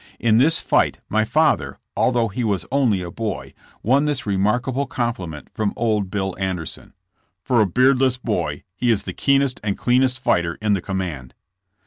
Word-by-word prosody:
In 115 -1 +3
this 160 +6 +4
fight - - +1
my 110 +1 +2
father, 115 - +1 0.2
although 120 -2 +2
he 115 +4 -3
was 100 -5 -1
only 120 -9 +2
a 85 - -6
boy, 105 -3 -4 0.3
won 135 +6 +3
this 140 -2 -2
remarkable 120 +8 0
compliment 95 - -4
from 105 -2 -1
old 105 -4 0
Bill 95 -2 -2
Anderson: 95 -5 -4 0.5
''For 125 -4 +4
a 105 - +3
beardless 130 +4 +3
boy 125 - -2
he 120 +4 0
is 110 -4 +2
the - - -5
keenest 140 -2 +2
and 100 -2 -1
cleanest 125 +1 +2
fighter 85 -8 +1
in 105 -1 +1
the 95 - 0
command." 85 -10 -4
110 Hz, 165 wpm, -21 LUFS, 95-130 Hz, 0.5 s, this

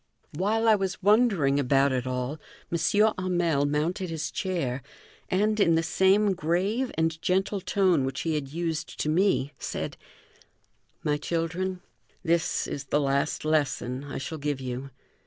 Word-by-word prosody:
While 215 +8 +1
I 220 - +7
was 195 -2 -1
wondering 200 - +4
about 135 +1 +3
it 130 -1 -1
all, 130 +4 -3 0.3
M. 170 - +1 0.4
Hamel 175 -6 +1
mounted 165 +6 -1
his 160 -2 -3
chair, 140 -9 -2 0.5
and, 210 +3 +1
in 170 -5 +4
the 165 - +2
same 195 +4 +3
grave 190 +9 0
and 160 0 0
gentle 195 +1 0
tone 185 -7 +2
which 135 0 -3
he 165 - -1
had 150 -3 -2
used 165 +2 -4
to 155 - 0
me, 160 -4 +2
said: - - -4 1.1
"My 150 -1 +1
children, 175 +4 -2 0.4
this 170 -1 +1
is 140 - -5
the 145 - +1
last 140 +1 0
lesson 140 -4 0
I 145 - -6
shall 155 +4 -5
give 145 -1 -2
you. 130 +1 -5
165 Hz, 150 wpm, -27 LUFS, 140-190 Hz, 1.1 s, I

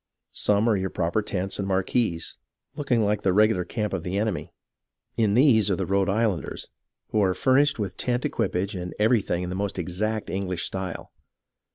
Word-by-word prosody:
Some 105 +2 +2
are 110 - +4
your 95 -1 -1
proper 85 +5 0
tents 95 -1 -3
and 100 - -2
marquees, 95 -2 -1 0.4
looking 125 -7 +1
like 105 0 0
the 95 - +2
regular 105 -2 +4
camp 105 +2 -3
of 95 - -1
the 90 +3 -3
enemy. 105 -3 -1 0.7
In 110 -3 +2
these 115 -6 +5
are 95 - +2
the - - -2
Rhode 100 0 +1
Islanders, 100 -6 -1 0.4
who 110 - +1
are 95 -2 +2
furnished 140 +2 +3
with 100 -4 -4
tent 125 0 -1
equipage 95 +4 -1
and 90 -1 -5
everything 105 -5 +2
in 90 - -4
the - - -3
most 100 0 -2
exact 105 +5 -2
English 90 -3 -2
style. 95 -3 -5
100 Hz, 180 wpm, -25 LUFS, 95-110 Hz, 0.7 s, these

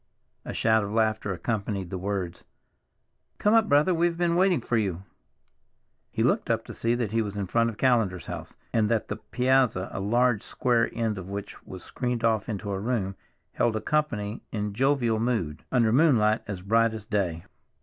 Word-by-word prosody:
A - - -4
shout 110 -1 +2
of 100 - -4
laughter 110 -2 +1
accompanied 100 -1 -3
the 95 - -3
words. 95 -2 -3 0.9
"Come 210 - +2
up, 225 -1 +4
brother, 150 +6 +4
we've 170 0 +1
been 170 -1 +1
waiting 185 -3 +3
for 120 0 -2
you!" 95 -5 -1 1.1
He - - -1
looked - - +1
up - - 0
to - - -8
see 115 +1 0
that 120 -4 -2
he 115 0 +1
was 105 -2 -4
in 100 - -1
front 115 +5 +2
of 110 - -8
Callender's 110 - +1
house, - - -7 0.2
and 110 -2 +2
that 115 -3 0
the - - -3
piazza, 125 -6 +1
a - - -4
large 120 +2 +2
square 120 -2 +1
end 110 -4 -2
of 95 0 -8
which 100 0 -6
was 95 -2 -9
screened 125 -2 -3
off 110 -1 +1
into 105 -1 -4
a 95 - -2
room, 100 -3 -1 0.4
held 115 -2 +1
a - - 0
company 115 -9 -1
in 105 -2 -3
jovial 125 -2 +1
mood, 110 -11 -2
under 115 -4 +3
moonlight 120 -7 +4
as 95 -3 -5
bright 115 +2 +2
as 110 -2 -8
day. 95 -7 -1
110 Hz, 190 wpm, -27 LUFS, 100-125 Hz, 1.1 s, up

